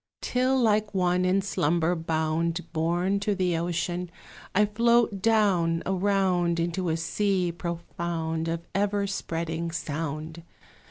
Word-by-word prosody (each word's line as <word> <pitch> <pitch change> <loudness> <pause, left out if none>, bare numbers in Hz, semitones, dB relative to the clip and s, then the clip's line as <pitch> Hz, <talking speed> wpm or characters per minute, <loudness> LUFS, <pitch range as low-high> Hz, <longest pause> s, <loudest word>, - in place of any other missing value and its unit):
Till, 255 +1 +1
like 215 -3 +2
one 180 0 +2
in 190 +1 +2
slumber 170 -3 +1
bound, 165 +1 -1
Borne 175 +4 +1
to 205 0 0
the 180 -2 +1
ocean, 175 +1 -2 0.5
I 210 +2 +5
float 230 -1 +2
down, 190 -7 +2
around, 185 -3 +1
Into 175 +1 -1
a 160 - 0
sea 185 +2 0
profound, 170 -1 -3
of 165 0 -3
ever 200 0 +1
spreading 165 -3 -3
sound. 160 0 -4
175 Hz, 120 wpm, -27 LUFS, 165-200 Hz, 0.5 s, I